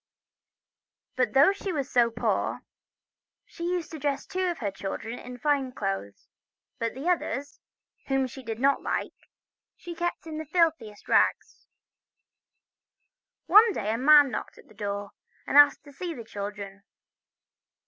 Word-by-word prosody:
But 255 -3 0
though 275 +7 +6
she 395 -1 -5
was 285 -6 -2
so 240 -2 +3
poor, 230 0 -1 0.8
she 340 - -8
used 355 -3 -2
to 320 - -7
dress 280 -1 -2
two 370 0 -2
of 345 - -3
her 205 -4 -3
children 195 +5 -6
in 250 0 -9
fine 275 -1 0
clothes; 195 - -4 0.5
but 230 0 -2
the 275 +6 -5
others, 285 -5 -1 0.5
whom 270 -1 +1
she 260 +1 -9
did 225 -2 -6
not 275 +2 +3
like, - - -2 0.6
she 345 - -8
kept 345 0 -3
in 315 -1 -6
the 315 - -5
filthiest 320 - 0
rags. - - +1 1.8
One 430 +1 +7
day 215 - -2
a - - -1
man 290 0 +7
knocked - - -5
at - - -16
her - - -19
door, 200 -1 -4 0.3
and - - -3
asked 290 0 +7
to 290 - -14
see 340 +2 -5
the 235 - -9
children. 200 -1 -7
270 Hz, 150 wpm, -27 LUFS, 225-315 Hz, 1.8 s, One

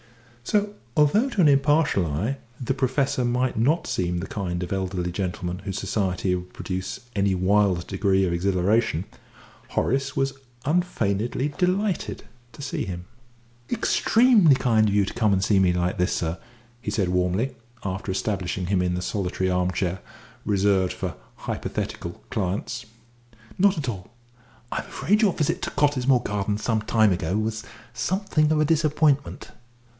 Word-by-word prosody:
So, 205 - 0 0.2
although 200 - +4
to 210 -7 +1
an 160 - +6
impartial 140 - +3
eye 100 - -1 0.2
the 125 - -1
Professor 130 0 0
might 125 +1 0
not 150 +9 +2
seem 90 -1 -1
the 85 - -4
kind 90 -3 -3
of 90 - -4
elderly 90 -2 -2
gentleman 90 -1 -3
whose 95 -1 -5
society 95 -2 0
would 90 0 -4
produce 95 0 -4 0.2
any 100 -1 +2
wild 95 -1 +2
degree 95 -1 +1
of 85 - 0
exhilaration, 95 +1 +1 0.6
Horace 135 +2 0
was 135 0 +1 0.3
unfeignedly 130 - 0
delighted 190 +1 0 0.3
to - - -11
see - - -2
him. 90 -1 -6 0.6
"Extremely 225 - +4
kind 110 -5 +3
of - - -1
you 100 -1 +4
to - - -5
come 110 -3 +2
and 95 -1 +2
see 100 -1 +3
me 95 -2 +4
like 90 0 -1
this, 90 - +2
sir," 85 +1 -2 0.4
he - - -4
said 100 -3 0
warmly, 90 +8 0 0.3
after 95 +1 -3
establishing 95 -2 -2
him 95 0 +1
in 90 -1 0
the 90 - -3
solitary 95 -2 -1
armchair 90 0 0 0.5
reserved 100 -2 +2
for - - -4 0.2
hypothetical 85 0 -5
clients. 110 +4 -2 0.7
"Not 200 0 +4
at 145 -4 -3
all. 100 -4 -5 0.6
I'm - - -1
afraid 210 +3 +1
your 205 -5 +4
visit 150 - -1
to - - -2
Cottesmore 135 -3 +2
Gardens 105 0 -2
some 110 -2 +1
time 110 -2 +3
ago 90 +3 -1
was 110 0 -2 0.3
somewhat 185 - -3 0.2
of 155 - +3
a 155 - +4
disappointment." 150 -2 +1
105 Hz, 150 wpm, -25 LUFS, 90-135 Hz, 0.7 s, an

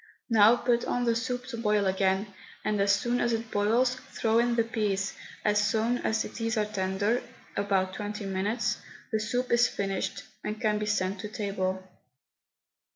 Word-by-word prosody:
Now 220 +1 +7
put 240 -1 +1
on 245 - 0
the 235 -1 +2
soup 245 +2 -2
to 235 - -5
boil 210 -2 +2
again, 190 +1 +1 0.3
and 210 -1 +1
as 200 0 +4
soon 240 +5 +1
as 235 -1 +1
it 225 0 -3
boils 230 +5 +3 0.2
throw 225 0 +2
in 240 0 +2
the 230 - +3
peas; 205 -4 -1 0.3
as 210 0 +3
soon 225 +3 +1
as 220 0 0
these 230 0 -3
are 210 - +2
tender 205 +3 0 0.3
about 195 -2 +1
twenty 210 +1 -4
minutes 195 +4 -1 0.3
the 220 - +1
soup 245 +4 -1
is 240 +1 +5
finished 195 -1 -3 0.2
and 215 +1 -3
can 215 -3 +1
be 210 - -2
sent 195 -2 0
to 210 - -4
table. 190 -4 -2
210 Hz, 170 wpm, -28 LUFS, 200-230 Hz, 0.3 s, Now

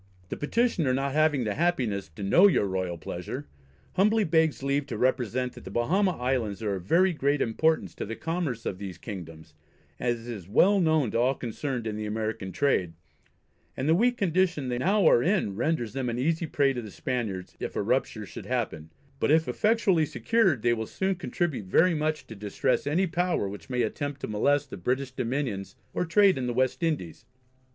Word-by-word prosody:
The - - -3
Petitioner 165 - +1
not 135 +1 -1
having 155 -3 +3
the 105 -2 -1
happiness 125 - 0
to 100 - -6
know 175 - +6
your 180 - +2
royal 95 -2 -2
pleasure, 80 - -6 0.5
humbly 215 +3 +3
begs 160 -4 +2
leave 140 +1 0
to 120 - -4
represent 125 0 0
that - - -12
the - - -8
Bahama 180 +10 +1
Islands 120 -5 -1
are 105 -2 0
of 95 - -3
very 180 - +4
great 145 -1 +1
importance 160 +8 +1
to - - -5
the 115 - -4
commerce 160 -8 -3
of 95 - -3
these 95 -4 -6
Kingdoms, 80 -6 -9 0.5
as 120 -1 -2
is 105 -8 -7
well 195 - +4
known 155 - +2
to - - 0
all 130 +3 +2
concerned 125 0 -4
in 110 -1 -3
the 105 0 -4
American 110 -2 -3
trade; 95 -6 +1 0.8
and 130 - -2
the 160 - +5
weak 240 +7 +3
condition 175 - +1
they 120 0 -1
now 195 +6 +2
are 120 - +6
in 175 - +1
renders 120 -1 -1
them 130 -2 -2
an 120 - -3
easy 160 +5 0
prey 140 -2 +2
to 125 - -4
the 110 - -8
Spaniards, 105 -4 -4
if - - -5
a - - 0
rupture - - -1
should - - -9
happen; 80 0 -2 0.3
but - - +1
if 160 +2 +4
effectually 205 -8 +2
secured, 155 - +1
they 120 -1 +4
will 110 -1 -3
soon 195 0 -1
contribute 175 - -3
very 175 - +4
much 155 -3 -1
to 115 - -10
distress 105 +6 -1
any 170 +7 +2
power 175 - 0
which 95 -4 -9
may 125 -1 +1
attempt 145 -1 -3
to - - -3
molest 140 +7 +1
the - - -6
British 130 +8 -1
Dominions 125 -5 -3 0.2
or - - 0
trade 195 -1 +4
in 125 - -2
the 120 - -2
West 130 +5 +1
Indies. 150 - -2
130 Hz, 195 wpm, -27 LUFS, 110-165 Hz, 0.8 s, know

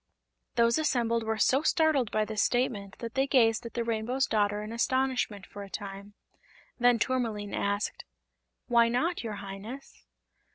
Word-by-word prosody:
Those 235 +3 +3
assembled 235 -6 +1
were 220 0 -2
so 265 +5 +3
startled 310 -6 +2
by 215 0 +1
this 215 -1 -1
statement 210 -6 0
that 230 -1 -6
they 270 +1 +1
gazed 230 -4 +3
at - - -13
the 235 - 0
Rainbow's 230 +3 0
Daughter 205 -1 0
in 215 - -7
astonishment 245 -4 0
for 205 - -10
a 200 - -8
time. 200 0 -7 0.6
Then 245 0 +5
Tourmaline 225 -4 -1
asked: 205 +1 -1 0.6
"Why 235 -1 +4
not, 320 +8 0
your 220 -2 -4
Highness?" 200 +7 -9
230 Hz, 155 wpm, -29 LUFS, 210-250 Hz, 0.6 s, Then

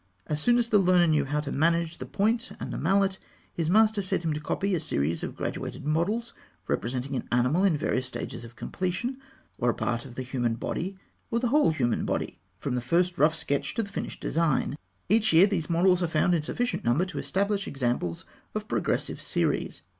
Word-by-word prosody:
As 150 -1 -2
soon 240 +5 +4
as 235 -1 +1
the 210 - +5
learner 180 -2 +5
knew 155 -3 +3
how 145 +2 -1
to 145 -2 -5
manage 165 +2 +1
the - - -6
point 230 +5 +1
and - - -5
the - - -3
mallet, 190 +2 +2 0.3
his 165 -2 -1
master 215 +2 +4
set 190 -2 -1
him 160 -2 0
to 150 - -3
copy 195 +6 -1
a 175 - +2
series 80 - -1
of - - -5
graduated - - -4
models 195 +10 0 0.3
representing 125 +3 -2
an - - -3
animal 125 +9 +3
in 185 -6 +4
various 130 -3 -1
stages 120 - -6
of 115 +1 -11
completion, 215 - -3 0.4
or 120 - +2
a - - +3
part 120 0 -1
of 125 -3 -11
the 130 - -3
human 120 -3 -1
body, 185 +10 -3 0.3
or 230 - 0
the 240 0 +1
whole 295 - +4
human 125 -7 0
body, - - -2 0.2
from 135 +6 -3
the 125 - 0
first 175 +7 +1
rough 155 +2 +5
sketch 140 -3 -2
to 230 - +1
the 200 - -8
finished 200 - -5
design 155 -4 +1 0.4
(fig. 225 +2 +6
182). 215 - -1
Every 160 - +4
year, 185 +4 +8
these 180 -6 -2
models 180 +2 +4
are 175 - +2
found 160 +2 +2
in 165 - +2
sufficient 245 +11 -2
number 120 +10 +2
to 175 -6 -5
establish 200 +1 0
examples 120 -11 -2 0.3
of - - -3
progressive - - -1
series. - - -1
165 Hz, 215 wpm, -27 LUFS, 135-195 Hz, 0.4 s, year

